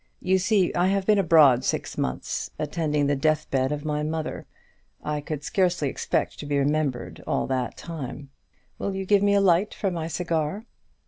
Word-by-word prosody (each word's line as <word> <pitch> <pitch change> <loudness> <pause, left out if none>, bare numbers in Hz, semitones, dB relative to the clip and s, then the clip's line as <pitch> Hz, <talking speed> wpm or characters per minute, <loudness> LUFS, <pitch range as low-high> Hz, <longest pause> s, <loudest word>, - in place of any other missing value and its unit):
You 190 +1 +2
see, 190 -1 +2
I 175 +1 +2
have 195 0 +1
been 210 0 +4
abroad 155 -8 +5
six - - -2
months 65 - -3
attending 150 -1 -1
the 145 0 +2
deathbed 140 -2 +1
of 150 0 -4
my 150 -1 -1
mother. 155 +1 -4 0.6
I 150 0 -2
could 150 -1 -5
scarcely 180 -8 +1
expect - - -2
to 145 - -6
be 145 -1 0
remembered 135 - -1
all - - 0
that 130 -2 -2
time. 140 -4 -7 0.5
Will 200 - -2
you 190 0 -3
give 200 +1 +4
me 200 0 +3
a 200 - +4
light 190 +2 +3
for 195 - -1
my 165 -2 -3
cigar?" 165 +4 -2
155 Hz, 180 wpm, -25 LUFS, 145-185 Hz, 0.6 s, abroad